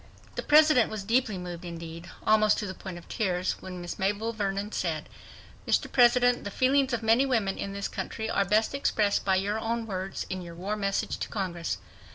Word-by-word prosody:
The - - -3
President 300 -5 +5
was 215 -2 -5
deeply 225 -1 +1
moved, 180 -1 -6
indeed, 170 0 -8 0.2
almost 215 -1 +4
to 210 - -2
the 190 - -4
point 185 -2 -8
of 175 - -12
tears, 185 -4 -1
when 185 -1 -7
Miss 175 -1 -6
Mabel 205 +4 0
Vernon 200 -1 -2
said, 160 -7 -2 0.6
"Mr. - - +1
President, 245 0 +4
the 205 - -4
feelings 265 +5 +2
of 235 -2 -1
many 225 +4 +5
women 225 -8 +1
in 195 - -4
this 200 0 -3
country 220 -1 -4
are 200 - +2
best 215 +5 +2
expressed 215 -7 +1
by 190 -1 +2
your 200 +3 0
own 230 +1 -2
words 190 -2 -4
in 185 0 -4
your 170 -1 -9
war 195 +5 -3
message 195 -2 -1
to - - -4
Congress 175 -5 -3
200 Hz, 200 wpm, -28 LUFS, 185-225 Hz, 0.6 s, President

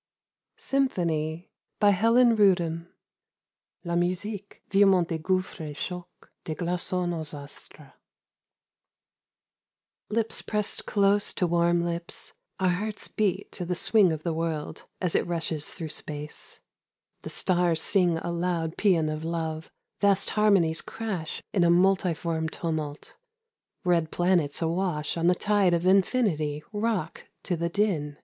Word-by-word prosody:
SYMPHONY. 170 - -1 0.3
(La 205 0 +7 2.0
musique, 190 +4 -3
virement 195 -3 +5
des 165 - -2
gotiffres 185 +3 -1
et 150 -2 -6
chocs 180 -1 -7 0.2
des 155 - -4
glacons 175 +1 -2 0.2
aax 155 -3 -5
astres.) 140 0 -12 2.2
LIPS 225 +1 0
pressed 210 -1 -2
close 200 0 +2
to 180 - +1
warm 170 0 +2
lips 170 0 -4 0.3
Our 185 -1 +2
hearts 205 +4 -2
beat 200 -2 -1
to 180 - -5
the 180 +1 -2
swing 200 0 +4
of 155 -1 -4
the 170 - -1
world 160 -2 -4
As 180 -3 0
it - - +1
rushes 160 -3 0
through 160 -2 -6
space, 150 0 -6 0.6
The - - -7
stars 175 -3 +2
sing 175 -1 +2
a 170 - -4
loud 170 -1 -2
paean 175 -7 +3
of 155 0 -3
love, 160 -1 -3 0.3
Vast 200 -1 +3
harmonies 195 -7 +3
crash 195 -8 -5
in 185 - +3
a 170 - +4
multiform 170 -3 +2
tumult, 155 -3 -4 0.7
Red 170 -3 +2
planets 175 -4 +1
a - - +1
wash 170 -3 -1
on 170 0 +1
the 180 - +5
tide 200 -3 +2
of 170 +1 -2
Infinity 185 - +2
Rock 205 -6 -2 0.2
to 180 - -1
the 170 +1 -2
din. 170 -7 -1
175 Hz, 130 wpm, -27 LUFS, 160-195 Hz, 2.2 s, La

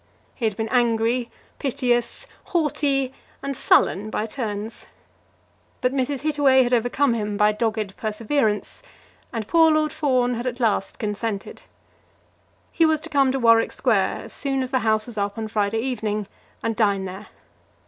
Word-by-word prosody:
He 235 - -3
had 215 -3 -1
been 220 0 -2
angry, 235 0 +1 0.3
piteous, 245 - -1 0.2
haughty, 285 -5 0 0.3
and 275 0 -3
sullen 210 -3 +3
by 215 - -2
turns; 220 -2 -5 0.9
but 250 +1 0
Mrs. 270 0 -1
Hittaway 285 -3 +4
had 245 0 -1
overcome 245 +3 +2
him 210 -2 -2
by 210 +1 +4
dogged 215 -2 -2
perseverance; 215 +1 -1 0.5
and 225 -4 -4
poor 325 -1 +5
Lord 310 0 +1
Fawn 255 -5 +1
had 240 +2 -3
at 250 0 -3
last 215 -5 0
consented. 210 -1 -4 1.1
He 335 - +2
was 315 -1 +3
to 330 - -8
come 275 -3 +3
to 270 - -1
Warwick 230 -2 +4
Square - - +1
as - - -7
soon 270 -2 -1
as 255 - -6
the 260 - +2
House 220 -2 +1
was 230 -4 -6
up 200 +1 -2
on 220 -1 -3
Friday 215 +1 0
evening, 215 -5 -2 0.4
and 225 -1 -1
dine 200 -4 +1
there. 190 +3 -8
235 Hz, 160 wpm, -23 LUFS, 215-270 Hz, 1.1 s, poor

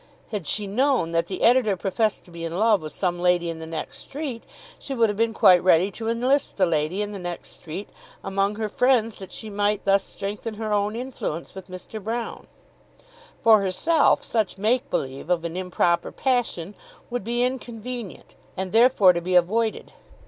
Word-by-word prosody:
Had 205 -7 -4
she 210 - 0
known 240 - +1
that 165 0 +1
the 185 - -4
editor 235 -5 +4
professed 210 +3 -1
to 175 - -17
be 170 0 -8
in 165 +1 -3
love 215 -1 +3
with 155 -1 -6
some 175 +2 -1
lady 175 -1 +2
in 165 - -8
the 160 - -7
next 160 -1 -5
street, 275 -5 -6 0.4
she 275 - -5
would 230 -3 +3
have - - -6
been 230 0 +2
quite 180 -5 +5
ready 185 +2 +4
to 225 +2 -4
enlist 255 +5 +1
the 190 - +4
lady 165 +4 0
in 205 - -5
the 200 - -6
next 175 -1 -6
street 175 +5 -7 0.4
among 195 +1 0
her 220 0 -2
friends 230 -1 +2
that 190 -2 -10
she 220 -2 -7
might 205 0 0
thus 195 0 +4
strengthen 205 +3 -5
her 215 0 -3
own 205 +1 0
influence 235 -10 -5
with 190 -1 -10
Mr. 185 +3 -8
Broune. 230 +2 -4 1.0
For 220 -2 +7
herself 295 - +2
such 215 -5 -1
make 225 +5 +1
belief 135 +4 -3
of 170 -2 +1
an 170 0 -4
improper 180 -2 0
passion 235 -8 -1 0.4
would 245 -3 -2
be 240 +3 0
inconvenient, 245 -4 -5 0.2
and 190 -1 -3
therefore 225 -5 +6
to 170 - -2
be 180 +1 -1
avoided. 215 +6 +1
205 Hz, 185 wpm, -24 LUFS, 180-230 Hz, 1.0 s, For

